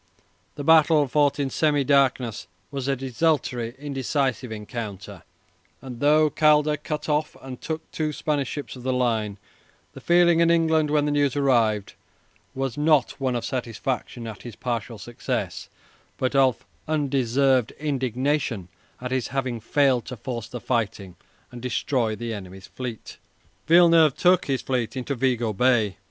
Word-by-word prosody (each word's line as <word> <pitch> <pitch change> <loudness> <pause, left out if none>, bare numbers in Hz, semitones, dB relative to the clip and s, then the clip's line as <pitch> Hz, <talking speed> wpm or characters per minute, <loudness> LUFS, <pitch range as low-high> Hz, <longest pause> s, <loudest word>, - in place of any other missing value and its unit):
The 145 - -5
battle, 155 -1 +5
fought 145 +1 +2
in 135 -2 -1
semi 145 -1 +2
darkness, 130 -5 +1 0.2
was 135 -2 -4
a 140 - +1
desultory, 130 -3 -1
indecisive 135 -3 -2
encounter, 105 -2 -7 0.6
and 125 -2 -9
though 150 +2 +4
Calder 150 -1 +4
cut 150 0 -5
off 150 0 -1
and 130 -2 -9
took 160 0 -5
two 155 -1 -2
Spanish 145 -2 -1
ships 145 -2 -6
of 125 - -10
the 130 +1 -1
line, 110 -5 0 0.6
the - - -11
feeling 175 -1 +4
in 170 0 +4
England, 160 -2 +3
when 150 -1 +2
the 150 - 0
news 145 -2 +1
arrived, 115 -7 +1 0.6
was 135 -1 -3
not 150 -1 +3
one 130 -2 0
of 120 - -2
satisfaction 125 -1 -4
at 110 -2 -8
his 120 -4 -9
partial 115 +1 -4
success, 115 +4 -4 0.5
but 130 +1 -1
of 130 -6 +3 0.2
undeserved 135 -4 +1
indignation 130 - -2 0.3
at 125 0 -5
his 130 -2 -1
having 130 -3 -2
failed 130 +1 +2
to 125 - -7
force 115 0 -5
the 125 +1 -7
fighting 105 -7 -2 0.4
and 120 -1 -9
destroy 120 -2 -1
the 115 0 -5
enemy's 95 -2 -9
fleet. 125 -4 -7 0.5
Villeneuve 165 -3 +6
took 180 0 +4
his 135 -2 -1
fleet 130 -1 -2
into 130 +2 -3
Vigo 120 -4 0
Bay. 110 -4 +2
130 Hz, 150 wpm, -24 LUFS, 120-145 Hz, 0.6 s, Villeneuve